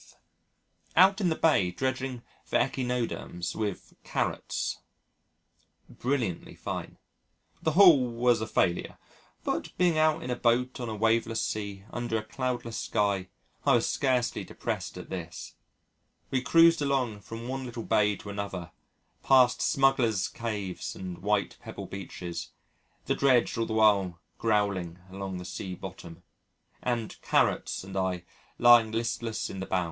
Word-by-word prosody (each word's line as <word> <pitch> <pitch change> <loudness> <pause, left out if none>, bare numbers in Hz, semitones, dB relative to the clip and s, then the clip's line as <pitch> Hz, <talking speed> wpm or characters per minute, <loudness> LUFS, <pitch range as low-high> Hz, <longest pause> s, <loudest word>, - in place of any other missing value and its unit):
Out 190 +3 +6
in 180 - +3
the 160 - +1
Bay 145 - +3
dredging 130 +3 -3 0.2
for - - -5
Echinoderms 125 -8 -2
with 105 -4 -4
"Carrots." - - -2 1.1
Brilliantly 120 -9 -2
fine. - - -5 0.6
The 160 -2 +1
haul 160 -9 +7
was 120 -1 +2
a 110 - -2
failure, 90 -5 0 0.5
but, - - -3
being 175 -3 +3
out 155 +1 +3
in 125 - -3
a - - 0
boat 125 +2 +1
on 120 -2 -3
a 110 - -3
waveless 115 +1 +1
sea 100 -2 -4
under 120 -2 -1
a 110 - -3
cloudless 120 0 -3
sky, 100 -3 0 0.4
I - - +5
was - - +2
scarcely 130 -3 0
depressed - - -4
at - - -9
this! 85 -2 -6 0.8
We 130 - +1
cruised 165 +3 +5
along 130 -7 0
from 115 +3 -8
one 135 +1 -3
little 120 -2 -6
bay 105 -1 +3
to 100 - -8
another, 100 -4 -5 0.5
past 130 -2 +5
smugglers' 130 -8 +3
caves 105 -6 -4
and 90 -2 -6
white 105 0 0
pebble - - -7
beaches, 90 -3 -6 0.6
the - - +1
dredge 130 -3 +3
all 115 0 -1
the - - -3
while 100 -5 +3 0.2
growling 100 -6 0
along 95 -1 -5
the 90 - -7
sea 95 0 -5
bottom, 85 0 -9 0.6
and 120 -3 -2
"Carrots" - - +1
and 95 +1 -9
I 95 -2 -1 0.3
lying 120 -2 +7
listless 115 0 -2
in 95 - -7
the 95 - -4
bows. 95 - +1
115 Hz, 140 wpm, -28 LUFS, 100-130 Hz, 1.1 s, haul